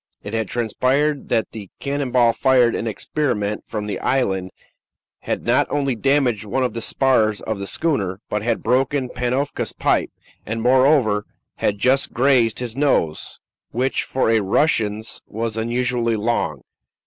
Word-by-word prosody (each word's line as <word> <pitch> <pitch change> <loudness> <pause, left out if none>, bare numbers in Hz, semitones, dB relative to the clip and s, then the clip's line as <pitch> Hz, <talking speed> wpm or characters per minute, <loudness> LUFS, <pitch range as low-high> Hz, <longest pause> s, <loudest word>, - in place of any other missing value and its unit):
It 105 - -7
had 110 -2 -1
transpired 130 +6 0
that 115 -2 0
the 105 -4 -9
cannon 140 -1 -2
ball 120 -2 +4
fired 125 -3 +3
in 115 - -2
experiment 105 -3 -2
from 105 -1 -4
the 105 - -4
island 95 -8 0 0.7
had - - -4
not - - +3
only 140 -2 0
damaged 125 -3 +1
one 120 +5 -1
of 125 - -1
the 115 - -4
spars 110 -5 +2
of 110 -2 -4
the 100 - -4
schooner, 100 - -1
but 105 - -2
had 115 +1 -1
broken 130 +1 +1
Panofka's 130 +4 -2
pipe, - - +1 0.3
and, 110 +2 -4
moreover, 125 -3 +3 0.3
had 105 - 0
just 130 +6 +2
grazed 125 -3 +3
his 120 -2 -3
nose, 130 - 0 0.3
which, 130 +3 0
for 130 -3 0
a 115 - +4
Russian's, 110 0 0
was 115 0 -3
unusually 120 0 0
long. 115 +3 -1
120 Hz, 150 wpm, -21 LUFS, 110-135 Hz, 0.7 s, ball